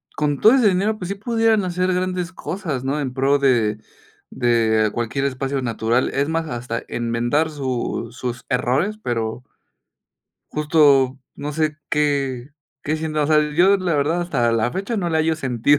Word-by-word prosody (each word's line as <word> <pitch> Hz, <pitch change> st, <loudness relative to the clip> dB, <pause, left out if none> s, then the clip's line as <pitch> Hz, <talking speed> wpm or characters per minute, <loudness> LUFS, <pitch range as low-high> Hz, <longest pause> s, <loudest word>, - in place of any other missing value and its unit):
con 145 Hz, -2 st, 0 dB
todo 220 Hz, +4 st, +7 dB
ese 245 Hz, -6 st, +5 dB
dinero, 200 Hz, +4 st, 0 dB
pues 180 Hz, -2 st, -6 dB
sí, 200 Hz, -, -2 dB
pudieran 225 Hz, -1 st, +1 dB
hacer 180 Hz, +1 st, 0 dB
grandes 180 Hz, -1 st, -2 dB
cosas, 160 Hz, -11 st, -4 dB
¿no? 140 Hz, +3 st, -1 dB
En 130 Hz, -3 st, -3 dB
pro 135 Hz, +2 st, +2 dB
de 115 Hz, -6 st, +2 dB, 0.5 s
de 110 Hz, -3 st, +2 dB
cualquier 120 Hz, +5 st, -2 dB
espacio 135 Hz, 0 st, -2 dB
natural. 115 Hz, +1 st, 0 dB
Es 140 Hz, +2 st, 0 dB
más, 165 Hz, 0 st, -1 dB
hasta 120 Hz, -3 st, -4 dB
enmendar 120 Hz, +7 st, 0 dB
su 130 Hz, -5 st, -3 dB
sus 125 Hz, 0 st, -5 dB
errores, 130 Hz, +12 st, 0 dB
pero 120 Hz, -, -3 dB, 1.1 s
justo, 140 Hz, -4 st, +3 dB
no 145 Hz, +1 st, -5 dB
sé, 155 Hz, 0 st, -1 dB
qué 140 Hz, -4 st, 0 dB, 0.3 s
qué 155 Hz, +2 st, -1 dB
siento, 155 Hz, -1 st, -1 dB
o 145 Hz, -, +1 dB
sea, 155 Hz, -1 st, +4 dB
yo 190 Hz, +5 st, +5 dB
la 185 Hz, -3 st, -1 dB
verdad 160 Hz, +5 st, +1 dB
hasta 120 Hz, -9 st, 0 dB
la 115 Hz, +1 st, 0 dB
fecha 200 Hz, +5 st, -3 dB
no 175 Hz, -4 st, -1 dB
le 160 Hz, -, +1 dB
hallo 160 Hz, 0 st, +2 dB
sentido 130 Hz, 0 st, +2 dB
145 Hz, 165 wpm, -21 LUFS, 125-175 Hz, 1.1 s, todo